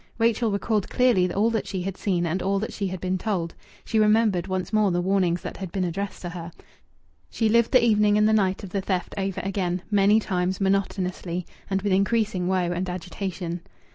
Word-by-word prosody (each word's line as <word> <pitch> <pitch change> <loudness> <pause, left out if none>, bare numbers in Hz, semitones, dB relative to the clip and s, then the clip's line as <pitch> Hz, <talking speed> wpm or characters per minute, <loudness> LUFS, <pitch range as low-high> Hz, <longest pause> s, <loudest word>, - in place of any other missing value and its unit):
Rachel 230 0 +2
recalled 205 0 -1
clearly 225 -9 +3
all 215 +5 +2
that 225 -2 -2
she 185 -2 -3
had 195 0 -3
seen 180 -4 0
and 170 +3 -1
all 195 +1 +1
that 215 +3 -3
she 200 - -2
had 185 0 -5
been 185 +1 -1
told. 175 -5 -2 0.3
She 220 - +1
remembered 210 -4 +3
once 185 +1 -3
more 215 -2 +4
the 175 -1 0
warnings 180 -1 +1
that - - -6
had 190 -3 -6
been 190 0 -1
addressed 190 +4 -4
to 175 - -3
her. 170 -1 -7 0.8
She 225 - 0
lived 235 +1 +3
the 255 -3 +5
evening 210 -2 +4
and 210 0 +4
the 220 - +3
night 195 -3 +1
of 190 - -8
the 195 - -1
theft 185 -2 -2
over 195 -1 -2
again, 185 -2 -2
many 205 +1 +5
times, 185 -3 -1
monotonously, 185 -2 -1 0.2
and 195 0 -1
with 200 -2 +1
increasing 195 -2 +1
woe 180 -2 +1
and 180 +1 -2
agitation. 180 -1 -4
195 Hz, 205 wpm, -25 LUFS, 180-210 Hz, 0.8 s, the